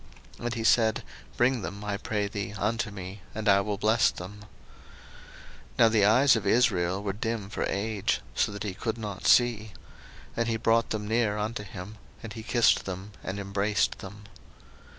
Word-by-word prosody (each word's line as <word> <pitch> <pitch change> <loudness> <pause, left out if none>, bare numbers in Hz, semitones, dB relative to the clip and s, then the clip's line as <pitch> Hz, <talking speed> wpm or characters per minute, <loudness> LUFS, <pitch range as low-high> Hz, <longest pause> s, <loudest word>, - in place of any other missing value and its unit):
And 120 -1 -3
he 115 - -3
said, 110 -1 +3 0.3
Bring 125 -1 +2
them, 100 +2 -6
I 105 -1 -2
pray 105 0 -2
thee, 100 0 -5
unto 105 +2 -1
me, 95 -1 -8
and 110 0 -3
I 100 0 +6
will 100 0 -2
bless 110 +4 +3
them. 95 +4 -8 1.4
01:048:010 - - -24
Now 115 - +6
the 110 -3 +3
eyes 130 +6 +6
of 105 -3 -2
Israel 100 -5 +2
were 100 -1 -2
dim 110 -1 -3
for - - -2
age, 105 0 -1
so - - +1
that 100 - -6
he 100 -3 -3
could 115 +4 -3
not 105 -4 -4
see. 110 -4 +3 0.6
And 115 0 0
he 115 -1 0
brought 115 +1 +2
them 105 -1 -3
near 110 -2 +1
unto 105 +1 -3
him; 100 +2 -9 0.2
and 115 - -7
he 115 - -7
kissed 120 +1 +3
them, 95 +2 -6
and 95 +2 -4
embraced 100 +1 0
them. 100 +2 -10
105 Hz, 180 wpm, -28 LUFS, 100-115 Hz, 1.4 s, I